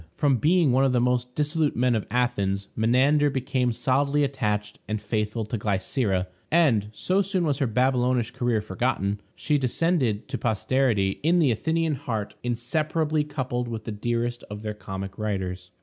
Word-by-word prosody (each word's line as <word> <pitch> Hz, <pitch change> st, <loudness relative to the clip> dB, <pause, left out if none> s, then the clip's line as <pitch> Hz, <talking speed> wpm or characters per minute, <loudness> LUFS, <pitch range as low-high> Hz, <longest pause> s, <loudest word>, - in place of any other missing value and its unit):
From 140 Hz, -3 st, +2 dB
being 160 Hz, -, +3 dB
one 130 Hz, +2 st, +3 dB
of 135 Hz, -2 st, +2 dB
the 125 Hz, -, +3 dB
most 125 Hz, 0 st, 0 dB
dissolute 150 Hz, 0 st, +1 dB
men 125 Hz, +1 st, +2 dB
of 110 Hz, -3 st, -1 dB
Athens, 100 Hz, -6 st, 0 dB
Menander 135 Hz, +6 st, +3 dB
became 130 Hz, -2 st, 0 dB
solidly 140 Hz, +4 st, +1 dB
attached 105 Hz, -6 st, -2 dB
and 110 Hz, +1 st, -2 dB
faithful 105 Hz, +1 st, -2 dB
to 110 Hz, +1 st, -4 dB
Glycera, 100 Hz, -1 st, 0 dB, 0.3 s
and, 130 Hz, -11 st, +3 dB
so 185 Hz, -, +1 dB
soon 190 Hz, -2 st, 0 dB
was 145 Hz, -3 st, 0 dB
her 135 Hz, -, +2 dB
Babylonish 125 Hz, 0 st, +1 dB
career 120 Hz, -3 st, 0 dB
forgotten, 100 Hz, -1 st, -1 dB, 0.2 s
she 150 Hz, -1 st, 0 dB
descended 130 Hz, -, 0 dB
to -, -, -3 dB
posterity 110 Hz, -3 st, +1 dB
in 165 Hz, +4 st, +3 dB
the 150 Hz, -7 st, +4 dB
Athenian 160 Hz, +7 st, 0 dB
heart 110 Hz, -6 st, -4 dB
inseparably 150 Hz, +6 st, 0 dB
coupled 130 Hz, -5 st, -3 dB
with 115 Hz, -2 st, -5 dB
the 110 Hz, -, -5 dB
dearest 120 Hz, +3 st, -2 dB
of 105 Hz, +1 st, -7 dB
their 105 Hz, -1 st, -3 dB
comic 95 Hz, -1 st, -7 dB
writers. 95 Hz, -4 st, -3 dB
125 Hz, 165 wpm, -25 LUFS, 105-140 Hz, 0.3 s, the